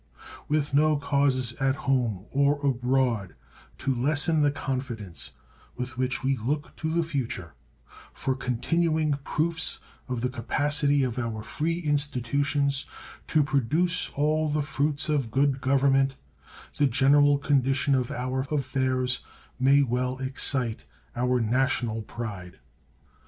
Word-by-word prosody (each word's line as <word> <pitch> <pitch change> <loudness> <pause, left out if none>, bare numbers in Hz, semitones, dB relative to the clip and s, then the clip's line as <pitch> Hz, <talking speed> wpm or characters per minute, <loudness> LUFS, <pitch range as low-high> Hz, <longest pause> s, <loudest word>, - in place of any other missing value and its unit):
With 150 -1 0
no 155 +1 +4
causes 140 -4 +1
at 135 0 +2
home 120 -9 -1
or 140 +1 +3
abroad 125 -6 +1 0.4
to 135 0 -1
lessen 150 +5 +2
the 145 - +4
confidence 125 - -4 0.4
with 125 -1 -5
which 130 +1 -1
we 135 +1 +2
look 145 +7 -3
to 160 - -2
the 170 +1 +1
future 120 - -4 0.6
for 135 - -2
continuing 155 +5 0
proofs 160 +2 0 0.3
of 125 -2 -3
the 125 - 0
capacity 145 +3 +1
of 125 -1 -2
our 115 -3 -3
free 165 +8 -2
institutions 140 -1 0 0.4
to 155 -2 +3
produce 150 +6 +2
all 155 +2 +1
the 150 0 0
fruits 145 +2 -1
of 145 -6 0
good 135 +2 +1
government, 135 0 +3 0.6
the 145 - +4
general 145 +3 +4
condition 140 -1 +1
of 130 -2 +1
our 130 -1 -2
affairs 130 -3 0 0.4
may 140 +2 +5
well 125 0 -1
excite 130 -3 0 0.4
our 125 +1 +1
national 120 -1 0
pride. 105 -5 -7
135 Hz, 125 wpm, -27 LUFS, 125-145 Hz, 0.6 s, may